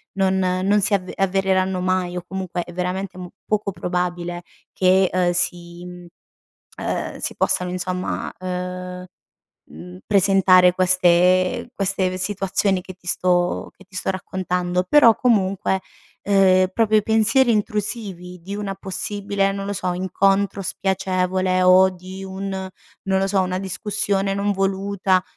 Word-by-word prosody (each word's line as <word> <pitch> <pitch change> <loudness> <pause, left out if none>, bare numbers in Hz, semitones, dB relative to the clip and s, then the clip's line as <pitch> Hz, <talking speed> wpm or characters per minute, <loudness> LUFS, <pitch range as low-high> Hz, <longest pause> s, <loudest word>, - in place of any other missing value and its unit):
non 190 -1 +1
non 185 +2 +1
si 205 - +1
av 185 -2 0
avvereranno 190 -1 +1
mai 185 -1 -1
o - - -3
comunque 185 -2 -4
è 175 - -12
veramente 185 +1 -3 0.3
poco 210 -2 0
probabile 175 -1 -3 0.3
che, 185 0 +3
uhm, 180 -1 +1
si 175 -1 -2 1.0
uhm, - - -3
si - - -3
possano 180 0 0
insomma, 185 0 -3
uhm, 180 0 -5 0.6
mhmm, 90 +4 -11
presentare 190 -2 +5
queste 185 0 +3
queste 195 -1 0
ve 185 - -5
situazioni 195 0 0
che 185 0 -9
ti 180 -1 -24
sto 175 0 0
che 190 - -17
ti 190 0 -23
sto 185 - -1
raccontando, 180 -1 -2
però 265 -7 +6
comunque, 195 -5 +1 0.4
uhm, 190 -2 +4
proprio 220 -1 +3
i - - 0
pensieri 225 +4 +3
intrusivi 205 -4 -3
di 195 +3 -6
una 200 -2 -4
possibile 195 +1 -2
non 195 0 -5
lo 200 - -2
so, 180 0 -2
incontro 195 +2 +1
spiacevole 185 0 0
o 185 +1 +6
di 185 +1 -9
un 190 +1 -5
non 190 0 -4
lo 195 - +1
so, 195 0 +1
una 185 0 -2
discussione 195 0 -1
non 200 +1 0
voluta, 195 -1 0
185 Hz, 135 wpm, -21 LUFS, 180-195 Hz, 1.0 s, però